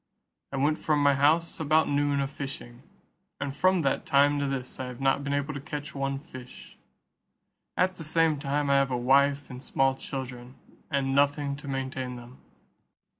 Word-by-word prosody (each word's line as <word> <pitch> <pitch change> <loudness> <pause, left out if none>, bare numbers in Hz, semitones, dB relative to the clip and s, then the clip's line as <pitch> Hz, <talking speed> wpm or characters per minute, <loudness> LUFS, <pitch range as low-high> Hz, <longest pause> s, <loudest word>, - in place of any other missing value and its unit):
I 140 - -3
went 150 +3 +1
from 155 -1 +1
my 140 0 +5
house 155 +6 +2
about 155 +1 +3
noon 145 0 +1
a 135 - 0
fishing, 135 -4 -7 0.6
and 140 -1 -4
from 185 +3 +3
that 135 -3 0
time 145 +1 +3
to 140 - 0
this 135 -2 -4
I 130 - -3
have 125 -1 -8
not 135 +1 +2
been 140 - -3
able 145 +1 -1
to 140 - -6
catch 150 -1 -6
one 135 0 -2
fish; 130 -3 -12 1.0
at 185 0 +2
the 165 - -7
same 160 -1 +2
time 140 0 0
I 140 - +5
have 140 0 +2
a 125 - -1
wife 140 +3 +3
and 125 0 -8
small 135 0 +1
children, 130 -2 -7 0.3
and 135 -2 0
nothing 140 0 +2
to 145 0 -10
maintain 130 -2 -3
them." 120 +1 -12
140 Hz, 180 wpm, -28 LUFS, 135-145 Hz, 1.0 s, my